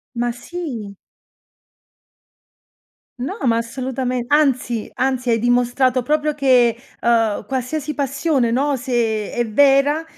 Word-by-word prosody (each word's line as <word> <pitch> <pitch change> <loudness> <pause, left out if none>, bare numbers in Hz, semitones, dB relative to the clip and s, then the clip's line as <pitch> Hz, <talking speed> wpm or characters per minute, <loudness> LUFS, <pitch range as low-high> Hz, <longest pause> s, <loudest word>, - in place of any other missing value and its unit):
Ma 240 0 0
sì! 245 - -7 2.2
No, 345 - -4
ma 230 -1 +3
assolutamente, 250 +1 -3
anzi 255 -6 +1
anzi, 255 -1 -1
hai 230 - +3
dimostrato 245 +2 +2
proprio 300 +3 0
che, 255 -5 +3 0.2
ehm, 225 -3 +1
qualsiasi 270 +5 -3
passione, 280 -2 0
no, 280 +3 +1
se 235 -4 -1
è 240 -1 -1
vera, 280 +6 +3
255 Hz, 105 wpm, -20 LUFS, 235-280 Hz, 2.2 s, ma